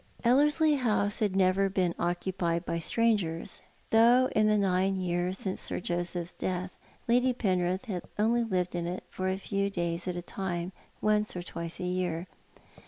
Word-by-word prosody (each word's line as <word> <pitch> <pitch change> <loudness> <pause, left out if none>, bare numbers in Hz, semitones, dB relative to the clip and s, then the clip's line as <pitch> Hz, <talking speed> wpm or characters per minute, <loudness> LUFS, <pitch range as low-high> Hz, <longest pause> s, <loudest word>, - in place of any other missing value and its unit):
Ellerslie 295 +5 +4
House 210 -5 +1
had 205 -3 0
never 195 +1 +3
been 185 -3 +1
occupied 175 0 -1
by 170 - -2
strangers, 200 -4 0 0.3
though 240 +3 +6
in 215 0 +4
the 215 0 +4
nine 195 -1 +2
years 180 0 -1
since 190 -1 -3
Sir - - -2
Joseph's 175 0 -3
death 185 0 -3 0.4
Lady 250 +2 +3
Penrith 185 -3 0
had 190 -7 -3 0.2
only 230 +3 +2
lived 185 -5 -1
in 170 -1 -2
it 180 +2 -4
for 185 0 -2
a 190 - -1
few 200 0 -1
days 170 -2 -2
at 180 - -2
a 175 - -4
time 180 -2 -3 0.3
once 215 -1 +1
or 180 - -4
twice 170 -1 -6
a - - -4
year. 180 -2 -1
185 Hz, 170 wpm, -29 LUFS, 175-215 Hz, 0.4 s, though